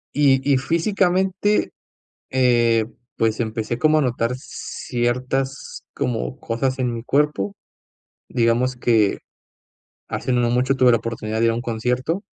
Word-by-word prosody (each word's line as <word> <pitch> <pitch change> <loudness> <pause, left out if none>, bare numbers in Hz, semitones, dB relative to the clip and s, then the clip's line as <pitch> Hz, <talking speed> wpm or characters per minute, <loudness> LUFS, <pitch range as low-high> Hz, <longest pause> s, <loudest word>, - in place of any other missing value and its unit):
Y 140 -1 +3
y 135 - +4
físicamente, 185 +5 +1 0.6
eh, 120 -3 +3 0.3
pues 110 -1 +1
empecé 115 0 -2
como 155 +3 +4
a - - +3
notar 125 -2 0
ciertas, 130 +2 -3
como 125 0 -2
cosas 130 +3 -1
en 125 -2 0
mi 115 -1 -5
cuerpo, 130 -8 0 0.7
digamos 120 +2 +1
que, 115 -4 +2 0.9
hace 130 - -3
no 120 -1 +2
mucho 130 +2 +2
tuve 130 -2 +5
la 115 - +4
oportunidad 110 -1 -4
de 115 - +3
ir 115 - +4
a - - -2
un 120 - -3
concierto 125 - -1
125 Hz, 135 wpm, -21 LUFS, 115-135 Hz, 0.9 s, tuve